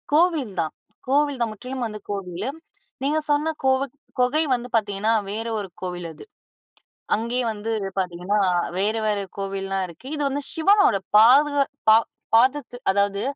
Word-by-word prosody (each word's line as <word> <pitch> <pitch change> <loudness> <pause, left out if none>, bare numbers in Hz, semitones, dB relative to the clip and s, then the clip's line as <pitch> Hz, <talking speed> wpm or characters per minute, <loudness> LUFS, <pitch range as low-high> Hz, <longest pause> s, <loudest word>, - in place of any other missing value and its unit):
கோவில் 305 - +2
தான் 160 -2 -1 0.3
கோவில் 285 0 +2
தான் 235 - +1
முற்றிலும் 250 +4 -5
வந்து 215 -1 -7
கோவிலு. 195 +2 -4 0.5
நீங்க 295 +3 +1
சொன்ன 300 +2 +1
கோவுக் 265 0 +1 0.2
கொகை 255 +6 +4
வந்து 245 0 -2
பாத்தீங்கன்னா, 210 0 +1 0.2
வேற 220 +3 -3
ஒரு 200 - -5
கோவிலு 180 -2 -4
அது. - - -13 0.9
அங்கேயே 235 +3 -1
வந்து 215 +1 -4 0.3
பாத்தீங்கன்னா, 180 +3 -1 0.4
வேற 205 +3 +1
வேற 210 -1 +1 0.2
கோவில்லாம் 195 -1 -2
இருக்கு. 170 +9 -13
இது 295 - -4
வந்து 280 +1 -2
சிவனோட 395 - +4 0.2
பாது 270 +7 +6 0.4
பா 220 - +9 0.4
பாதத்து 255 +1 +2
அதாவது, 200 +1 +1
225 Hz, 140 wpm, -23 LUFS, 200-275 Hz, 0.9 s, பா